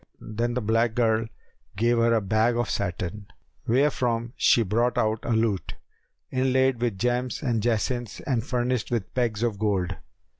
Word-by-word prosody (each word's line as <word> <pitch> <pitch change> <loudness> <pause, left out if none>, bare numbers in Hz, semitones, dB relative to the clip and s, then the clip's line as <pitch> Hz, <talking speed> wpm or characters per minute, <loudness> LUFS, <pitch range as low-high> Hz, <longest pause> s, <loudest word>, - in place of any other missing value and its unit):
Then 120 +2 -3
the 125 - -1
black 115 +1 +1
girl 115 -2 +2 0.5
gave 120 +4 +2
her 115 0 +3
a 110 - +2
bag 110 +4 +2
of 120 -4 -1
satin 100 +1 -3 0.4
wherefrom 120 -2 +1
she 115 - +4
brought 115 +5 0
out 110 0 +1
a - - -6
lute, 110 -4 0 0.6
inlaid 130 -1 +2
with 115 -5 0
gems 125 +6 -1
and 120 -5 0
jacinths 120 +1 -1
and 125 -6 -1
furnished 125 -2 -1
with 115 -6 -2
pegs 115 -3 0
of 110 -4 -1
gold. 95 -4 0
115 Hz, 155 wpm, -26 LUFS, 110-120 Hz, 0.6 s, she